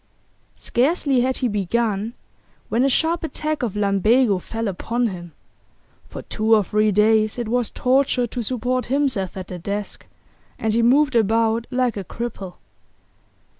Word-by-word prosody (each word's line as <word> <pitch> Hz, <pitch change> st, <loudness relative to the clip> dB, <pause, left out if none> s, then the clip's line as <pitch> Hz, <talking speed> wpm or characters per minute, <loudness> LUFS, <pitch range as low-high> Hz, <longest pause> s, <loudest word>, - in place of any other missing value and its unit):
Scarcely 270 Hz, 0 st, +1 dB
had 260 Hz, +1 st, 0 dB
he 255 Hz, -, 0 dB
begun 210 Hz, +2 st, -1 dB, 0.5 s
when 235 Hz, +3 st, +1 dB
a 275 Hz, -, +3 dB
sharp 325 Hz, +5 st, +1 dB
attack 310 Hz, -1 st, -3 dB
of 230 Hz, -6 st, -2 dB
lumbago 205 Hz, +2 st, +2 dB
fell 225 Hz, +4 st, -4 dB
upon 230 Hz, +6 st, -2 dB
him; 175 Hz, -3 st, -8 dB, 0.8 s
for -, -, -8 dB
two 220 Hz, +1 st, +2 dB
or 210 Hz, -, +3 dB
three 215 Hz, +2 st, +1 dB
days 215 Hz, +2 st, +3 dB
it 240 Hz, -2 st, -3 dB
was 240 Hz, -1 st, 0 dB
torture 255 Hz, -1 st, +1 dB
to 240 Hz, +1 st, -5 dB
support 250 Hz, +2 st, -1 dB
himself 255 Hz, -9 st, -1 dB
at 185 Hz, 0 st, -7 dB
the 180 Hz, -, -6 dB
desk, 200 Hz, +3 st, -5 dB, 0.5 s
and 220 Hz, -1 st, -1 dB
he 230 Hz, -, +2 dB
moved 265 Hz, +3 st, +3 dB
about 225 Hz, +1 st, +2 dB
like 250 Hz, -3 st, 0 dB
a 200 Hz, -, -4 dB
cripple. 200 Hz, -3 st, -6 dB
230 Hz, 150 wpm, -22 LUFS, 210-255 Hz, 0.8 s, a